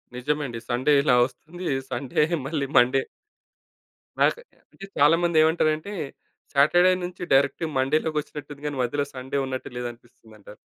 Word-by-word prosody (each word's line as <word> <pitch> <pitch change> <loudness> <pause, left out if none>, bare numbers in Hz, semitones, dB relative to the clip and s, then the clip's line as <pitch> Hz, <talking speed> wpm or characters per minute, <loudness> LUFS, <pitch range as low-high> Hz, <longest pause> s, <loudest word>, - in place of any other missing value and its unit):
నిజమండి. 140 -1 -2
సండే 130 +5 +2
ఇలా 125 -4 +3
వస్తుంది. 175 +7 -9 0.2
సండే 125 +3 -1 0.2
మళ్ళీ 140 -2 -2
మండే 130 +2 +5 1.2
నాకా 485 - +3 0.3
అంటే 195 - -11
చాలామంది 165 +3 +4
ఏమంటారంటే, 160 +3 +1 0.6
సాటర్డే 175 +6 +5
నుంచి 180 0 -7
డైరెక్ట్‌గా 140 +4 +2
మండేలోకొచ్చినట్టుందిగానీ 150 0 -2
మధ్యలో 145 +4 -1
సండే 130 +2 -4
ఉన్నట్టు 130 0 -5
లేదనిపిస్తుందంటారు. 115 -3 -10
145 Hz, 105 wpm, -25 LUFS, 130-155 Hz, 1.2 s, మండే